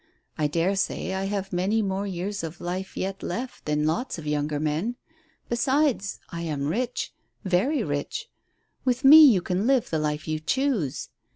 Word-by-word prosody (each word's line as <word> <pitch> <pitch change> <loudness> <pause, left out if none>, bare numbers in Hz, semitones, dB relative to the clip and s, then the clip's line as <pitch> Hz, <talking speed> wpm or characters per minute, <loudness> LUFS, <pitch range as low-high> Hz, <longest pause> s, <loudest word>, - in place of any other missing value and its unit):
I 150 - +1
dare 170 +6 +1
say 190 -1 -1
I 190 0 -2
have 195 -1 -3
many 200 +5 +1
more 195 +1 -2
years 195 +1 -3
of 165 +1 -6
life 185 +2 -4
yet 195 +1 -3
left 250 +2 -5
than 150 0 0
lots 225 +11 -1
of 160 - -8
younger 150 0 -1
men. 155 +10 -1 0.5
Besides, 260 -3 +1
I 170 - -5
am 150 -4 -2
rich 240 - -2 0.3
very 225 - +1
rich. 145 -1 -3 0.6
With 255 0 0
me 310 +3 +11
you 220 - +6
can 185 +4 0
live 265 -3 +2
the 160 - +1
life 150 0 -2
you 155 0 -1
choose. 220 - -1
190 Hz, 170 wpm, -26 LUFS, 155-235 Hz, 0.6 s, me